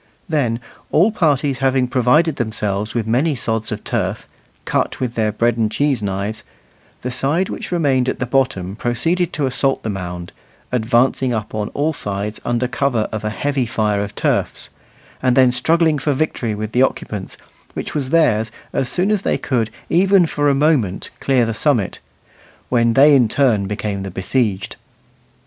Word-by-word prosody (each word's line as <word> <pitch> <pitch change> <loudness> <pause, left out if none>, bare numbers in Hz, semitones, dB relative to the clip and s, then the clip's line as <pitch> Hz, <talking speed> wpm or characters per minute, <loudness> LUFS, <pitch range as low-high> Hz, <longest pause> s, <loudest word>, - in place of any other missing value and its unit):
Then, 130 -9 0 0.3
all 180 +9 +4
parties 145 - +1
having 130 -1 +2
provided 135 +5 +2
themselves 105 -2 -2
with 115 -3 0
many 135 +7 +1
sods 115 -2 -2
of - - -4
turf, - - -2 0.4
cut - - -1
with 125 -2 -2
their 110 -2 0
bread 115 +2 +1
and 110 -2 +1
cheese 135 +1 +1
knives, 100 +2 -3 0.6
the 125 - -2
side 150 +9 0
which - - -6
remained 135 -7 +2
at - - -2
the 125 - -2
bottom 120 -8 0
proceeded 165 +10 0
to 150 - 0
assault 135 +1 0
the 110 - -2
mound, 90 -2 -6 0.4
advancing 125 +1 +2
up 105 -1 -4
on 105 -1 -2
all 155 +3 +1
sides 105 -4 -4
under 120 +1 0
cover 125 -4 0
of 110 -1 -4
a 105 - -1
heavy 135 +2 -1
fire 105 -2 0
of 100 - -7
turfs, - - -1 0.5
and 125 -1 +2
then 130 -2 +6
struggling 160 +4 +2
for 145 +1 0
victory 130 -6 -1
with 105 +1 -4
the 125 - +2
occupants, 105 -6 -2 0.4
which - - -5
was 140 -4 -2
theirs 115 -9 +2 0.2
as 125 - 0
soon 185 +4 +1
as 210 -3 +1
they - - 0
could, 115 -5 -1 0.2
even 190 +1 +4
for 145 -2 +1
a 140 - +3
moment, 135 - +1
clear 130 -3 +2
the 115 - -2
summit, 115 - 0 0.7
when 115 -2 +3
they 145 +4 +7
in 125 -5 +4
turn 110 -7 +2
became 105 -1 -3
the 95 - -5
besieged. 95 +1 -1
125 Hz, 170 wpm, -19 LUFS, 110-145 Hz, 0.7 s, they